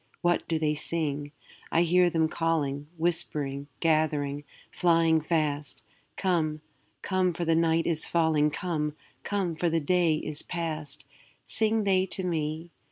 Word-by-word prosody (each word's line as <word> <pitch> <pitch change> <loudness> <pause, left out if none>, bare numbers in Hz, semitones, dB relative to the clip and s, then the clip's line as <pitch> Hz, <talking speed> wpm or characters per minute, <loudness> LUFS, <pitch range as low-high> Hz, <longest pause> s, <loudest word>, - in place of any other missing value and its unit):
What 175 0 +1
do 165 - 0
they 155 -1 +1
sing? 145 -2 -2 0.4
I 165 - +4
hear 180 +1 +4
them 160 -1 +2
calling, 150 -4 -1
Whispering, 145 -4 -1
gathering, 150 -3 +1 0.3
flying 165 -2 +3
fast, 150 -5 -1 0.3
'Come, 160 -5 0 0.4
come, 185 -2 +1
for 170 - -2
the 165 0 +3
night 165 0 +2
is 160 -2 0
falling; 160 -3 +3
Come, 150 -2 -2 0.3
come, 195 -5 -1
for 170 +2 +1
the 165 0 +1
day 170 +1 +2
is 155 -1 -2
past!' 155 -5 -4 0.4
Sing 220 0 +2
they 190 -1 +2
to 190 0 0
me? 160 0 -2
160 Hz, 140 wpm, -28 LUFS, 150-175 Hz, 0.4 s, I